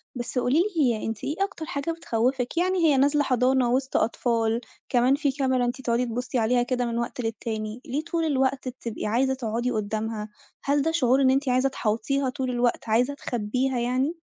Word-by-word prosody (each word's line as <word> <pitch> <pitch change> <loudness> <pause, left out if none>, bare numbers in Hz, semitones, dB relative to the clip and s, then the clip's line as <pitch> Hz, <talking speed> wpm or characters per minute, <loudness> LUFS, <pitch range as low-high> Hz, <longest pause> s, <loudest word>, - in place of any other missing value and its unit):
بس 245 +1 -4
قولي 270 +7 +3 0.2
لي 240 -7 +2
أنتِ 225 -2 -4
إيه 295 - -2
أكتر 380 -5 -2
حاجة 300 -1 -3
بتخوّفِك؟ 250 -3 -1
يعني 370 +2 +2
هي 295 -4 +4
نازلة 290 +2 +3
حضانة 255 -1 +2
وسط 265 +1 +1
أطفال، 230 0 +1 0.3
كمان 250 +2 +4
فيه 285 -2 0
كاميرا 260 -2 +2
أنتِ 245 +2 -3
تقعدي 240 0 +1
تبُصي 245 +2 -3
عليها 240 +2 +2
كده 245 0 -1
من 235 -1 -2
وقت 235 +1 -3
للتاني، 225 0 -4
ليه 285 +5 -2
طول 335 -1 -1
الوقت 270 -2 0
بتبقي 240 -4 -5
عايزة 260 +5 +2
تقعدي 240 0 -2
قدامها؟ 215 0 -3 0.3
هل 285 +1 +2
ده 325 - +1
شعور 265 -4 +3
إن 260 - +5
أنتِ 270 0 +1
عايزة 255 +2 +3
تحاوطيها 260 +3 -1
طول 255 0 -3
الوقت 240 -2 0
عايزة 245 +5 +2
تخبيها 250 0 -1
يعني؟ 255 +7 0
250 Hz, 185 wpm, -25 LUFS, 235-275 Hz, 0.3 s, إن